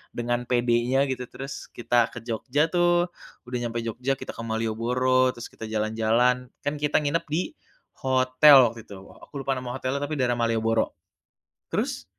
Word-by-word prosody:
Dengan 120 Hz, +1 st, -2 dB
pedenya 120 Hz, +2 st, +2 dB
gitu 125 Hz, -1 st, -3 dB
terus 135 Hz, +1 st, -8 dB
kita 120 Hz, 0 st, +2 dB
ke 120 Hz, -2 st, -8 dB
Jogja 130 Hz, +7 st, 0 dB
tuh, 175 Hz, 0 st, +3 dB, 0.4 s
udah 125 Hz, 0 st, -3 dB
nyampe 120 Hz, 0 st, -2 dB
Jogja, 125 Hz, +4 st, -2 dB
kita -, -, -7 dB
ke 115 Hz, -, -6 dB
Malioboro, 125 Hz, +3 st, +1 dB
terus 120 Hz, -, -9 dB
kita 110 Hz, -, -8 dB
jalan-jalan. 115 Hz, +3 st, +1 dB, 0.2 s
Kan 145 Hz, +1 st, -2 dB
kita 150 Hz, -1 st, +1 dB
nginep 145 Hz, +4 st, 0 dB
di 155 Hz, +4 st, -2 dB, 0.5 s
hotel 130 Hz, 0 st, +6 dB
waktu 115 Hz, -1 st, -11 dB
itu, 100 Hz, -2 st, -10 dB
aku 100 Hz, -, -17 dB
lupa 135 Hz, 0 st, 0 dB
nama 125 Hz, -1 st, -5 dB
hotelnya 135 Hz, +2 st, -2 dB
tapi 150 Hz, +1 st, -3 dB
daerah 120 Hz, -1 st, +2 dB
Malioboro. 115 Hz, -1 st, +1 dB, 0.8 s
Terus -, -, -2 dB
125 Hz, 160 wpm, -25 LUFS, 115-135 Hz, 0.8 s, hotel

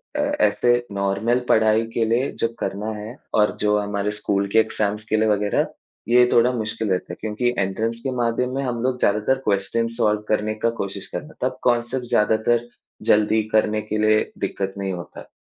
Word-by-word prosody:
अ, -, -, -1 dB
ऐसे 290 Hz, -, +2 dB, 0.2 s
नॉर्मल 100 Hz, +5 st, 0 dB
पढ़ाई 110 Hz, 0 st, +4 dB
के 115 Hz, -, +1 dB
लिए 120 Hz, +4 st, +1 dB
जब 115 Hz, 0 st, 0 dB
करना 100 Hz, +3 st, -3 dB
है 110 Hz, +4 st, -7 dB, 0.2 s
और 105 Hz, -1 st, +3 dB
जो 105 Hz, 0 st, +3 dB
हमारे 105 Hz, 0 st, -2 dB
स्कूल 100 Hz, -1 st, -1 dB
के 110 Hz, -, +6 dB
एग्ज़ाम्स 105 Hz, -1 st, -1 dB
के 110 Hz, -, +2 dB
लिए 110 Hz, 0 st, +2 dB
वगैरह, 105 Hz, -1 st, +1 dB, 0.4 s
ये 125 Hz, +1 st, +5 dB
थोड़ा 120 Hz, +2 st, +4 dB
मुश्किल 110 Hz, -2 st, -3 dB
रहता 90 Hz, -1 st, -1 dB
है -, -, -9 dB
क्योंकि 110 Hz, +3 st, -1 dB
एंट्रेंस 110 Hz, +4 st, -1 dB
के 135 Hz, -, -1 dB
माध्यम 125 Hz, +2 st, 0 dB
में 140 Hz, -, -1 dB
हम 120 Hz, -3 st, -2 dB
लोग 130 Hz, -1 st, 0 dB
ज़्यादातर 105 Hz, +6 st, +2 dB
क्वेश्चन्स 115 Hz, +3 st, 0 dB
सॉल्व 105 Hz, -3 st, +2 dB
करने 110 Hz, 0 st, +1 dB
का 115 Hz, -, +4 dB
कोशिश 100 Hz, 0 st, -5 dB
करना 150 Hz, +1 st, -6 dB
तब 130 Hz, -, -6 dB
कॉन्सेप्ट 120 Hz, +1 st, +1 dB
ज़्यादातर 110 Hz, +3 st, +2 dB, 0.4 s
जल्दी 110 Hz, +1 st, +3 dB
करने 110 Hz, 0 st, +2 dB
के 110 Hz, -, +1 dB
लिए 110 Hz, 0 st, +2 dB
दिक्कत 95 Hz, 0 st, -3 dB
नहीं 95 Hz, -1 st, -2 dB
होता। 85 Hz, -1 st, -9 dB
110 Hz, 185 wpm, -22 LUFS, 105-120 Hz, 0.4 s, के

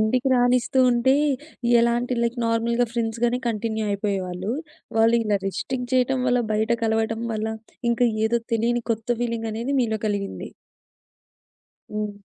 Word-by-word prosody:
ఇంటికి 250 Hz, +5 st, +2 dB
రానిస్తుంటే 250 Hz, +1 st, +3 dB, 0.6 s
ఎలాంటి 240 Hz, +1 st, +1 dB
లైక్ 235 Hz, +1 st, 0 dB
నార్మల్‌గా 235 Hz, +1 st, +1 dB
ఫ్రెండ్స్‌గానే 235 Hz, +1 st, 0 dB
కంటిన్యూ 220 Hz, 0 st, -2 dB
అయిపోయేవాళ్ళు. 195 Hz, -1 st, -2 dB, 0.5 s
వాళ్ళు 225 Hz, +1 st, +5 dB
ఇలా 210 Hz, -2 st, +1 dB
రిస్ట్రిక్ 250 Hz, +5 st, -3 dB
చేయటం 255 Hz, +1 st, +2 dB
వల్ల 245 Hz, 0 st, +3 dB
బయట 220 Hz, +2 st, 0 dB
కలవటం 225 Hz, +1 st, 0 dB
వల్ల 215 Hz, 0 st, -2 dB, 0.4 s
ఇంకా 240 Hz, +1 st, +2 dB, 0.2 s
ఏదో 235 Hz, +1 st, +1 dB, 0.2 s
తెలియని 235 Hz, +2 st, +1 dB
కొత్త 225 Hz, -, -5 dB, 0.2 s
ఫీలింగనేది 230 Hz, +2 st, -2 dB
మీలో 220 Hz, -2 st, 0 dB
కలిగింది. 200 Hz, -1 st, -3 dB, 1.4 s
హ్మ్. 210 Hz, -1 st, -3 dB
230 Hz, 115 wpm, -24 LUFS, 220-245 Hz, 1.4 s, వాళ్ళు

